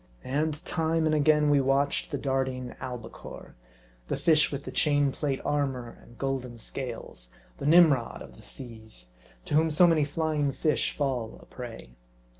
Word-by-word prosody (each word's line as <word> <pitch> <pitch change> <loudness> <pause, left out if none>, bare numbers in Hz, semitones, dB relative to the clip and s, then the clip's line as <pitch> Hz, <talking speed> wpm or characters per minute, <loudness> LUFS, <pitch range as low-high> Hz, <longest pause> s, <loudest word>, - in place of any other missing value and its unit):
And 150 +5 -1
time 160 -1 +1
and 155 - +2
again 150 0 +4
we 145 -1 +5
watched 135 +1 +1
the - - -2
darting 130 -2 -2
albicore, 120 -3 -8 0.5
the - - -1
fish 155 -2 +4
with 140 0 -5
the - - -5
chain 145 -2 +2
plate 135 0 -2
armor 135 -5 -1
and 120 - -17
golden 130 -3 -3
scales; 115 - -7 0.3
the - - -2
Nim 165 -1 +8
rod 120 -4 -4
of - - -13
the - - -15
seas, 110 - -8 0.4
to - - -5
whom 160 +2 +4
so 155 +4 +5
many 165 -3 +4
flying 150 -1 0
fish 150 +3 +1
fall 130 -6 -2
a - - -16
prey. 115 - -9
140 Hz, 165 wpm, -28 LUFS, 125-150 Hz, 0.5 s, Nim